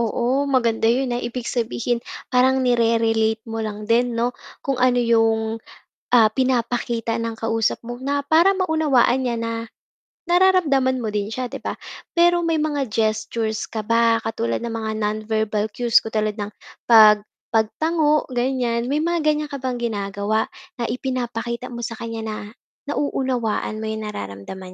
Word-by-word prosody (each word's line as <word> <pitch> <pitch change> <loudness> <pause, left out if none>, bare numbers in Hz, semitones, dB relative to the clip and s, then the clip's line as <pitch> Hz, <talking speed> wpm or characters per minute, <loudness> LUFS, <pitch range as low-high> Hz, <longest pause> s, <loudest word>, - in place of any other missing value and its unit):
oo, 245 +5 0
maganda 230 -4 +2
'yon, 250 +1 +1
ah, 240 - -1
ibig 240 0 -5
sabihin, 240 0 -1 0.3
parang 260 +1 +4
nire-relate 225 -2 +2
mo 225 -1 -4
lang 210 -1 -4
din, 235 +2 +2
'no, 240 +2 0 0.3
kung 270 -2 -1
ano 250 -1 +4
'yong, 225 -1 +2 0.6
ah, 220 -2 +6
pinapakita 240 -2 0
ng 230 -1 -3
kausap 225 0 -1
mo, 240 +1 -7
na 280 +2 -1
para 335 +7 +4
maunawaan 310 -9 +2
niya 235 - -1
na 230 0 -3 0.6
nararamdaman 335 -8 +3
mo 230 - -3
din 210 0 -2
siya, 250 +2 -3
'di - - -8
ba? - - -4 0.3
Pero, 345 0 +3
may 330 -2 +1
mga 290 -6 -1
gestures 220 0 -1
ka 220 - -5
ba, 230 +1 +3
katulad 115 - -2
ng 235 -1 -4
mga 220 -1 -3
non-verbal 215 0 -1
cues 235 +1 +3
katulad 215 -1 -1
ng, 205 -1 -5 0.3
pag 215 -3 +7 0.2
pagtango, 300 +7 +1
ganiyan, 245 -1 -1
may 295 - +1
mga 335 0 0
ganiyan 300 0 +1
ka - - -4
bang 255 -2 -3
ginagawa 205 - -1 0.2
na 240 - -4
ipinapakita 245 -2 -3
mo 240 - -6
sa 230 -1 -4
kaniya 225 -1 -5
na, 215 -1 -6 0.4
nauunawaan 250 -7 -1
mo 220 - -4
'yong 220 0 -3
nararamdaman 185 - -7
235 Hz, 155 wpm, -22 LUFS, 220-260 Hz, 0.6 s, pag